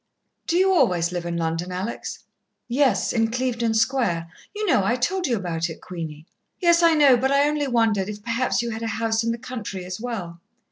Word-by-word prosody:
"Do 340 - +2
you 380 +1 +4
always 175 - +2
live 175 -1 -4
in 170 0 -2
London, 165 +2 -2
Alex?" 190 +6 -5 0.4
"Yes, 265 +2 +2
in 225 -1 +2
Clevedon 235 -2 -1
Square. 220 -9 +1 0.2
You 425 +1 -2
know, 265 - +3
I 230 +5 +2
told 355 +9 0
you 240 -3 +1
about 170 -3 -2
it, 160 - -8
Queenie." 160 -4 -7 0.3
"Yes, 340 -2 +4
I 335 -1 +5
know, 285 -4 +6
but 265 +3 +1
I 280 +1 +4
only 295 -1 0
wondered 225 -5 +1
if 210 0 -7
perhaps 240 +1 0
you 235 - -3
had 225 0 -5
a 230 - -2
house 225 0 0
in 230 - 0
the 230 - -3
country 230 -7 -6
as 185 +3 -6
well." 185 -9 -5
230 Hz, 205 wpm, -23 LUFS, 180-260 Hz, 0.4 s, know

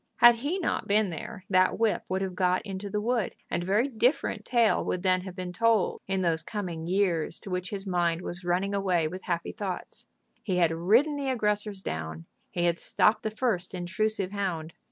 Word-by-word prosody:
Had 240 -1 +7
he 290 +10 -1
not 370 - -1
been 205 -2 +3
there 185 +5 -7
that 185 -1 +3
whip 225 -1 +1
would 190 +1 0
have 190 -1 -3
got 180 0 +1
into 200 0 -5
the 210 - -1
wood, 230 -1 0 0.2
and 170 - 0
a - - -5
very 210 +7 +3
different 245 +2 0
tale 235 -3 +3
would 180 - -2
then 185 -1 +3
have 185 -1 -8
been 180 -1 -5
told 230 -1 +2
in 190 0 0
those 165 -3 +1
coming 175 -6 -5
years 180 -4 +1
to 195 - -8
which 180 0 -2
his 200 -1 -5
mind 175 -2 0
was 175 +1 -6
running 180 +3 0
away 185 -5 +1
with 185 +4 -6
happy 170 -2 -2
thoughts. 190 -3 -6 0.3
He 185 -4 -1
had 170 -2 +4
ridden 225 - +3
the 275 -1 -2
aggressors 210 -4 -1
down; 80 +1 -5 0.2
he 175 - -2
had 170 -1 +1
stopped 215 0 +2
the 220 - -1
first 215 -5 -1
intrusive 195 +2 -1
hound. 175 -6 -3
190 Hz, 200 wpm, -28 LUFS, 175-215 Hz, 0.3 s, Had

